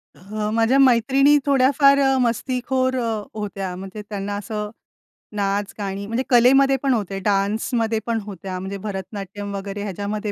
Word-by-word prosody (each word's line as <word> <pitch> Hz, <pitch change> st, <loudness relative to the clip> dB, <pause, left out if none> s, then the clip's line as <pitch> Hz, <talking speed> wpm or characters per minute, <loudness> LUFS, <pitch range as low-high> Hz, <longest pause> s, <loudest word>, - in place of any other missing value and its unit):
अ, 210 Hz, +3 st, -4 dB
माझ्या 230 Hz, +4 st, +3 dB
मैत्रिणी 270 Hz, +3 st, +5 dB
थोड्याफार 275 Hz, +1 st, +4 dB
अ, 270 Hz, -1 st, +3 dB
मस्तीखोर 255 Hz, +2 st, 0 dB
अ, 225 Hz, -3 st, -2 dB
होत्या. 195 Hz, -3 st, -4 dB
म्हणजे 195 Hz, +3 st, -8 dB
त्यांना 205 Hz, 0 st, -4 dB
असं 210 Hz, 0 st, -4 dB, 0.7 s
नाच 200 Hz, 0 st, -1 dB
गाणी 200 Hz, -1 st, -4 dB
म्हणजे 230 Hz, +4 st, -1 dB
कलेमध्ये 270 Hz, +3 st, +5 dB
पण 270 Hz, -2 st, +3 dB
होते, 200 Hz, -4 st, -2 dB
डान्समध्ये 220 Hz, +3 st, 0 dB
पण 230 Hz, -1 st, 0 dB
होत्या. 190 Hz, -2 st, -6 dB
म्हणजे 190 Hz, +1 st, -5 dB
भरतनाट्यम 200 Hz, 0 st, -6 dB
वगैरे 200 Hz, +1 st, -5 dB
ह्याच्यामध्ये 205 Hz, +1 st, -3 dB
210 Hz, 140 wpm, -22 LUFS, 200-250 Hz, 0.7 s, मैत्रिणी